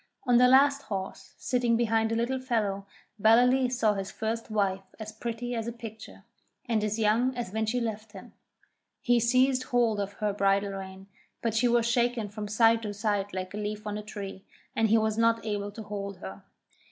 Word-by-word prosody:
On 245 -2 +4
the 250 +1 +6
last 280 +2 +5
horse, 195 -5 -6
sitting 245 -2 +1
behind 225 -1 +1
a - - +1
Little 240 +3 -1
Fellow, 210 -6 -1 0.3
Ballaleece 250 +3 +4
saw 220 -3 +3
his 195 -1 -4
first 225 +1 -4
wife 200 -3 0 0.2
as 215 0 -6
pretty 235 +2 -5
as 230 -1 -3
a - - -2
picture, 220 -3 -10 0.4
and 220 -3 0
as 215 +1 -1
young 230 +4 +2
as 235 -6 -4
when 220 0 -1
she 245 +3 0
left 220 -2 -4
him. 190 - -12 0.7
He 245 -1 +4
seized 255 +3 +3
hold 235 -4 +1
of 200 0 -3
her 210 0 -2
bridle 200 0 +1
rein, 190 0 -8 0.4
but 225 -1 0
he 245 - +3
was 235 -1 +3
shaken 235 -2 +1
from 210 0 -6
side 225 +2 +4
to 210 -2 -5
side 205 -1 -1
like 185 0 -5
a - - -5
leaf 210 0 -4
on 210 -1 -3
a 210 - -4
tree, 200 -2 -8 0.3
and 225 -1 +2
he 225 - +5
was 220 0 0
not 230 0 +2
able 205 -1 -3
to 220 +2 -8
hold 200 -2 -6
her. 95 - -9
220 Hz, 200 wpm, -28 LUFS, 205-235 Hz, 0.7 s, the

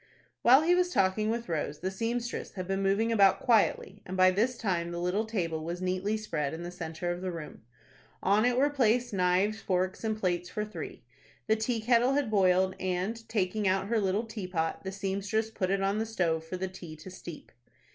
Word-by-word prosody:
While 260 +5 +7
he 345 +2 +4
was 360 0 +3
talking 205 - +2
with 235 +1 -2
Rose, 150 -3 -3
the 185 +1 -2
seamstress 230 +4 -3
had 185 -2 -5
been 195 0 -1
moving 200 +4 +2
about 195 -4 +5
quietly, 210 -3 +2
and 185 +1 -6
by 185 0 +6
this 230 +6 +1
time 175 -5 -1
the 170 0 -4
little 180 +5 0
table 165 -8 -2
was 170 +2 -4
neatly 185 +4 -1
spread 160 -9 -3
in 170 - -7
the 175 - -5
centre 175 0 -4
of 175 +1 -4
the 185 -1 -2
room. 165 -3 -8 0.6
On 205 +3 +4
it 245 0 +2
were 285 +3 +3
placed 245 -3 +2
knives, 190 +3 +2
forks, 185 +2 -1
and 220 -1 -1
plates 180 -3 -1
for 210 -1 -3
three. 215 - -8 0.4
The 220 - +3
teakettle 235 +3 +2
had 280 -6 0
boiled, 190 -2 +3
and, 190 +5 -3
taking 205 -1 0
out 190 +1 +1
her 230 -1 +2
little 200 +2 +1
teapot, 180 -7 -3
the 190 - -4
seamstress 200 +3 -2
put 190 -4 -2
it 195 0 +1
on 200 +2 +1
the 225 - -1
stove 170 -7 0
for 185 +3 -5
the 190 +1 -2
tea 175 -4 -9
to 160 +4 -11
steep. 175 -3 -10
195 Hz, 205 wpm, -29 LUFS, 180-220 Hz, 0.6 s, While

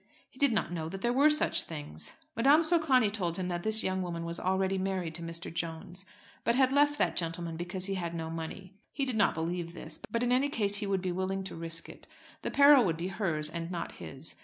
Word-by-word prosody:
He 260 - -19
did 280 -3 +4
not 210 -6 0
know 160 -2 -3
that 195 +2 -7
there 240 +2 +1
were 280 +4 +5
such 305 0 +4
things. 145 - -5 0.2
Madame 280 +8 +5
Socani 305 -10 +3
told 175 -5 -2
him 185 -1 -3
that 175 -1 -2
this 220 +3 +3
young 185 0 -1
woman 170 -2 -4
was 170 0 -3
already 190 +1 0
married 185 -3 -2
to 170 - -5
Mr. 165 0 -5
Jones, 170 +3 -5 0.4
but 235 - +2
had 265 0 +3
left 290 +1 +3
that - - +1
gentleman 165 0 -3
because 175 +2 -2
he 195 - -1
had 170 -3 -3
no 160 -1 -4
money. 165 +4 -7 0.2
He 275 - -1
did 255 -3 0
not 215 -2 +3
believe 170 +1 -3
this; 155 -2 -8
but 230 +2 -1
in 245 - +1
any 260 +3 +3
case 205 -6 +2
he 205 0 -3
would 195 -2 0
be 185 - -1
willing 190 +2 -2
to 190 - -6
risk 165 0 -3
it. - - -13 0.3
The - - -3
peril 280 -2 +7
would 165 -5 0
be 175 +3 -3
hers 170 -7 0
and 165 +1 -4
not 175 -2 -4
his. 135 +4 -7
185 Hz, 235 wpm, -30 LUFS, 170-225 Hz, 0.4 s, peril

